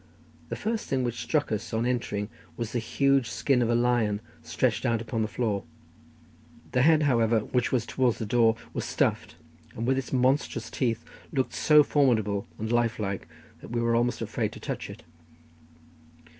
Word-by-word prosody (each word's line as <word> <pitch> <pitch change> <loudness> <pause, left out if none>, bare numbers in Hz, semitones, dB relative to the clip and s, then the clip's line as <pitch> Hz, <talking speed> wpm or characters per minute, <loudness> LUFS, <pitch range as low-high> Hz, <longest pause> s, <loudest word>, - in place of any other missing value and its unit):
The - - -2
first 220 +1 -3
thing 130 -2 0
which 120 -1 -2
struck 150 -5 0
us 110 +1 -3
on 115 +1 0
entering 115 -4 -1 0.3
was 115 -1 -3
the 120 - 0
huge 135 +2 +2
skin 135 -3 +1
of 115 - +1
a 120 - +3
lion 120 -4 +2 0.2
stretched - - 0
out 115 -1 +1
upon 115 0 -3
the 110 - +1
floor; 105 -3 -1 1.1
the 125 - +2
head, 155 +2 +5
however, 115 -5 +3
which 125 +3 -1
was 120 -3 +1
towards 125 -2 +1
the 110 - -3
door, 115 +1 +3 0.2
was - - -2
stuffed, - - -1 0.4
and 115 - -3
with 130 +1 +2
its 130 - -6
monstrous 130 +2 +1
teeth 115 -4 -1 0.3
looked 130 -2 -1
so 150 -1 +6
formidable 110 -9 +1
and 110 +1 -3
lifelike 110 -7 0 0.3
that - - -10
we 120 +1 -1
were 115 0 +2
almost 120 +1 +1
afraid - - -2
to - - -10
touch - - -5
it. - - -10
120 Hz, 175 wpm, -27 LUFS, 110-130 Hz, 1.1 s, so